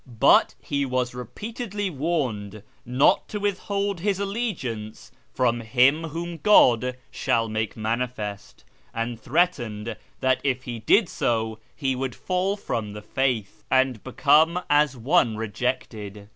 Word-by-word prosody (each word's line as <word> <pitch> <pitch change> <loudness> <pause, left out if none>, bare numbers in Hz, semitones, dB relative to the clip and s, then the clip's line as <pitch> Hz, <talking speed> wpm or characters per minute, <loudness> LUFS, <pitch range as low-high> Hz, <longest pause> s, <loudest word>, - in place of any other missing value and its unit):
But - - +5
he 140 -1 -2
was 125 -2 -1
repeatedly 205 - -5
warned 125 - -2 0.2
not 125 +3 +3
to 210 - -4
withhold 200 -1 -1
his 200 +1 0
allegiance 195 - -4 0.2
from 120 -2 +1
' - - -6
Him 135 +7 +3
whom 170 +2 -5
God 125 - +5
shall 115 -2 0
manifest,' 110 -1 -3 0.3
and 115 0 -3
threatened 120 -8 0 0.2
that 130 -1 +2
if 130 -2 0
he 120 -2 -5
did 195 - +4
so 110 -5 -1 0.2
he 135 -2 -1
would 130 -1 -3
fall 185 +2 -1
from 110 - -3
the 105 0 -8
faith, 110 -3 -1
and 130 -4 +2
become 160 +6 +3
as 145 -2 +3
one 115 -2 +2
rejected. 105 -3 -4
125 Hz, 130 wpm, -25 LUFS, 110-165 Hz, 0.3 s, But